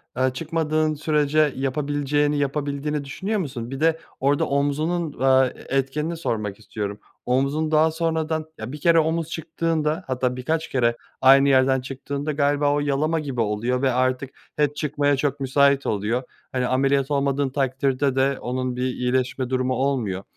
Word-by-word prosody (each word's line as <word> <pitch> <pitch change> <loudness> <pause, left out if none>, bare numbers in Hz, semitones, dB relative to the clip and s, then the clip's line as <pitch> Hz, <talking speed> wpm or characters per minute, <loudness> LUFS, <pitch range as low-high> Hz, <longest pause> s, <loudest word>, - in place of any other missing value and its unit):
aaa, 130 +1 +1
çıkmadığın 155 +1 0
sürece 150 -1 +2
yapabileceğini, 145 +2 0
yapabildiğini 145 +1 -2
düşünüyor 195 +10 -2
musun? 130 -8 -5
Bir 135 - -5
de 160 +1 +2 0.2
orada 140 +2 +2
omzunun, 150 +3 -1
va 130 0 +5
e 135 +2 -4
etkenini 150 +5 -1
sormak 105 -10 -3
istiyorum. 105 -1 -5 0.3
Omzun 140 +5 0
daha 155 +1 +4
sonradan 160 -1 -1
Ya, 110 +3 -6
1 150 - -7
kere 165 +2 +4
omuz 160 0 0
çıktığında 165 0 -1
hatta 125 -1 -1
birkaç 160 +6 -2
kere 120 -2 +1 0.2
aynı 135 +1 +7
yerden 130 -1 +4
çıktığında 140 +3 -4
galiba 145 0 +2
o 145 - +1
yalama 145 +3 0
gibi 135 -6 -3
oluyor 115 +4 0
ve 135 -1 +2
artık 130 +1 0 0.3
hep 145 -1 +1
çıkmaya 145 -1 +1
çok 140 0 -1
müsait 140 +1 +3
oluyor. 110 +5 -1 0.3
Hani, 125 -1 0
ameliyat 135 +2 +1
olmadığın 140 -1 +1
takdirde 135 0 0
de 135 0 +2
onun 125 0 -3
bir 125 - -2
iyileşme 125 0 -1
durumu 130 0 0
olmuyor. 125 -8 -1
140 Hz, 155 wpm, -23 LUFS, 130-150 Hz, 0.3 s, aynı